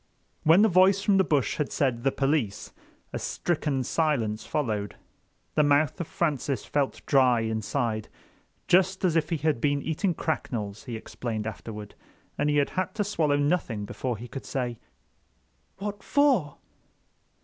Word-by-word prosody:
When 165 +6 +6
the - - +6
voice 190 +1 +4
from 200 -2 +4
the 190 - +5
bush 145 - +1
had 150 - -1
said 130 -5 0
"The 135 - +3
police," 135 -8 -1 0.4
a - - -2
stricken 150 -6 -1
silence 120 -8 0
followed. 110 -9 -2 0.6
The - - +3
mouth 145 +1 +2
of 170 - -4
Francis 140 -6 -1
felt 140 -2 -1
dry 130 -4 +4
inside, 110 0 -2 0.6
just 190 +1 +3
as 170 -3 +2
if 160 -1 +1
he 165 - 0
had 150 -4 0
been 145 -1 +1
eating 165 +3 0
cracknels, 110 -10 -3
he 120 -3 -5
explained 110 -1 -5
afterward, 105 -1 -7 0.4
and 150 - 0
he 145 - +2
had 185 +8 0
to 210 - +1
swallow 160 -8 +1
nothing 145 -8 0
before 125 +2 -3
he 120 +3 -8
could 130 +3 -8
say: 125 -3 -3 1.0
"What 205 +1 -5
for?" 250 - +2
145 Hz, 150 wpm, -27 LUFS, 115-165 Hz, 1.0 s, When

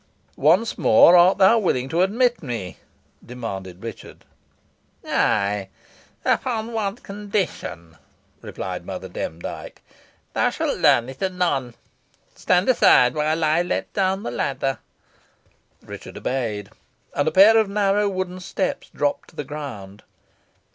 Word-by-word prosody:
"Once 175 +10 +3
more, 175 - +6
art 180 +2 +6
thou 195 +4 +5
willing 130 - 0
to 165 +5 0
admit 240 +6 +2
me?" 115 - -5 0.5
demanded 95 -7 -7
Richard. 115 - -9 0.8
"Ay, 100 -1 0 0.6
upon 230 -2 -1
one 205 -3 -2
condition," 195 - -5 0.4
replied - - -6
Mother - - -6
Demdike. 80 +2 -7 0.5
"Thou - - +2
shalt - - -2
learn 120 0 +4
it 130 0 -10
anon. 175 -10 -1 0.6
Stand 180 +1 +1
aside 125 - +5
while 155 +2 0
I 155 +2 +3
let 175 +1 -3
down 190 0 0
the - - -4
ladder." 135 +2 -2 1.0
Richard - - -10
obeyed, 110 -6 -3 0.4
and 145 - 0
a - - +2
pair 205 +6 +7
of 215 -2 +1
narrow 200 0 +1
wooden 185 -1 -4
steps 185 +1 -3
dropped 145 -1 -2
to - - -21
the 150 - -4
ground. 125 -9 -8
160 Hz, 125 wpm, -22 LUFS, 125-195 Hz, 1.0 s, pair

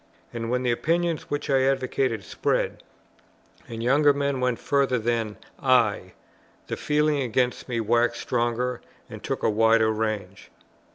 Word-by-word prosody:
And 115 -1 -4
when 125 +1 0
the 125 - +1
opinions 165 +6 -1
which 145 0 -3
I 135 -2 +3
advocated 130 -4 0
spread, - - -1 0.9
and 115 -1 -6
younger 145 +4 +4
men 140 -1 -1
went 125 -2 0
further 140 -3 +1
than 115 -2 -1 0.2
I, 115 -8 +2 0.5
the - - -4
feeling 150 -1 +1
against 125 +1 -1
me 120 -2 -1
waxed 120 +2 +1
stronger 120 0 -1 0.3
and - - -8
took - - -3
a - - +3
wider 110 +1 +4
range. 110 -3 -4
125 Hz, 145 wpm, -25 LUFS, 115-135 Hz, 0.9 s, younger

